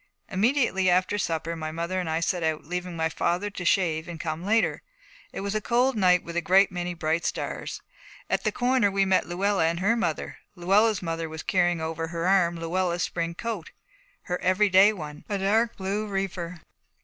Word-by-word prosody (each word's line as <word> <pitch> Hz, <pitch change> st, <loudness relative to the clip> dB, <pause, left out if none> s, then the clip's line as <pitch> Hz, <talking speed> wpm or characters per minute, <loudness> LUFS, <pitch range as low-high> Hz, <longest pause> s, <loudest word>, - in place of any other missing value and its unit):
Immediately 205 Hz, -2 st, +2 dB
after 185 Hz, +3 st, +2 dB
supper 165 Hz, -2 st, -2 dB
my 155 Hz, -1 st, -5 dB
mother 170 Hz, +3 st, -2 dB
and 180 Hz, -3 st, -3 dB
I 160 Hz, +1 st, 0 dB
set 175 Hz, +1 st, 0 dB
out, 160 Hz, -2 st, -1 dB
leaving 180 Hz, +1 st, -4 dB
my 160 Hz, -1 st, +1 dB
father 175 Hz, +5 st, -1 dB
to 195 Hz, -, -6 dB
shave 170 Hz, -3 st, +1 dB
and 170 Hz, -2 st, -7 dB
come 160 Hz, 0 st, -4 dB
later. 220 Hz, +3 st, +1 dB, 0.5 s
It -, -, -6 dB
was 200 Hz, +1 st, -2 dB
a 215 Hz, -, -1 dB
cold 245 Hz, +4 st, +2 dB
night 180 Hz, -3 st, +4 dB
with 170 Hz, -, -8 dB
a 175 Hz, -, +1 dB
great 195 Hz, +2 st, +4 dB
many 175 Hz, -1 st, -3 dB
bright 165 Hz, 0 st, -1 dB
stars. -, -, -4 dB, 0.4 s
At -, -, 0 dB
the -, -, +1 dB
corner 245 Hz, -3 st, +2 dB
we 195 Hz, 0 st, +1 dB
met 190 Hz, -3 st, +2 dB
Luella 185 Hz, 0 st, +1 dB
and 170 Hz, +1 st, -1 dB
her 200 Hz, +5 st, +2 dB
mother. 170 Hz, -9 st, -2 dB, 0.2 s
Luella's 200 Hz, +3 st, +2 dB
mother 165 Hz, -1 st, -3 dB
was 160 Hz, 0 st, -7 dB
carrying 175 Hz, -2 st, +1 dB
over 165 Hz, 0 st, -3 dB
her 170 Hz, +1 st, -2 dB
arm 180 Hz, -3 st, +3 dB
Luella's 175 Hz, +1 st, -1 dB
spring 170 Hz, -1 st, -2 dB
coat, 220 Hz, -5 st, -4 dB, 0.5 s
her 180 Hz, 0 st, -3 dB
everyday 190 Hz, +2 st, +5 dB
one, 150 Hz, -7 st, -8 dB
a 205 Hz, -, 0 dB
dark 220 Hz, +4 st, +1 dB
blue 200 Hz, +3 st, -2 dB
reefer. 180 Hz, -4 st, -4 dB
180 Hz, 190 wpm, -26 LUFS, 165-200 Hz, 0.5 s, everyday